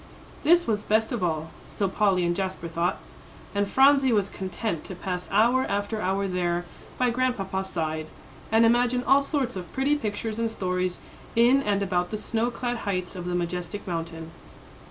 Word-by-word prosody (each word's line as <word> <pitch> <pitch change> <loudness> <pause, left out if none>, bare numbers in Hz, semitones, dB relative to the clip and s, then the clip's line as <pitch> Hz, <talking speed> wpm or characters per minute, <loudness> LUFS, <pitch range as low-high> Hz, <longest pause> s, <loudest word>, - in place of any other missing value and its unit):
This 345 +3 +5
was 210 -2 0
best 220 +1 +1
of 235 -6 -2
all 160 -2 -1 0.2
so 200 - -1
Polly 190 -2 +2
and 175 0 +1
Jasper 190 -3 -3
thought; 170 +2 -1 0.6
and 200 0 0
Phronsie 270 +1 +5
was 205 -3 +2
content 190 -2 -3
to 185 - -6
pass 180 0 -4
hour 235 +6 +4
after 205 +2 -1
hour 195 +2 0
there, 175 -1 -1 0.3
by 250 -1 +2
Grandpapa's 200 -7 -1
side, 155 -3 -2 0.4
and 225 +1 +5
imagine 245 +1 +3
all 275 +3 +5
sorts 275 -5 -1
of 180 -3 -6
pretty 275 +3 +2
pictures 220 -3 -3
and 230 0 +1
stories 180 -3 -2 0.3
in 245 +4 +5
and 200 -5 0
about 180 -2 0
the 215 - -3
snow 225 +2 -1
clad 245 0 -3
heights 185 -4 -3
of 180 -1 -6
the 180 0 -2
majestic 175 +2 -3
mountain. 165 -2 -5
200 Hz, 175 wpm, -26 LUFS, 180-235 Hz, 0.6 s, This